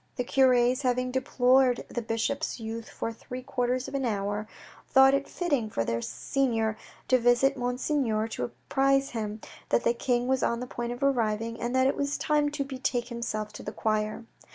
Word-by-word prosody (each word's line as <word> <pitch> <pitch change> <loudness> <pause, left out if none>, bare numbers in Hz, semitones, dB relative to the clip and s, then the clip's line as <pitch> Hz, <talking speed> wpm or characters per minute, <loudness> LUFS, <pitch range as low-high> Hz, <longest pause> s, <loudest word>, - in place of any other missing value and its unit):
The 250 - -1
cures, 255 0 +3
having 250 -1 0
deplored 255 0 +3
the 240 - -4
bishop's 230 +6 -2
youth 225 0 -6
for 230 - -4
three 250 +3 -8
quarters 250 0 -1
of - - -8
an 275 -1 -1
hour, 205 -2 -2 0.4
thought 265 0 +6
it 275 0 +1
fitting 285 -11 -1
for 115 - -1
their 115 0 -1
senior 225 - -1 0.3
to 255 - +4
visit 245 +3 +3
Monseigneur 245 -3 0
to 125 - -3
apprise 270 - +1
him 215 -2 -4 0.3
that - - +2
the 235 - +3
King 245 0 0
was 265 0 +1
on 235 0 +1
the 250 - -4
point 240 -1 -4
of 245 +3 -5
arriving, 230 -4 0
and 240 +2 -1
that 260 0 +4
it 270 - +2
was 280 0 -1
time 295 -1 +2
to 290 -1 -2
betake 255 -3 -2
himself 230 -3 -4
to - - -8
the 210 - -5
choir. 215 +1 -1
245 Hz, 185 wpm, -28 LUFS, 225-265 Hz, 0.4 s, thought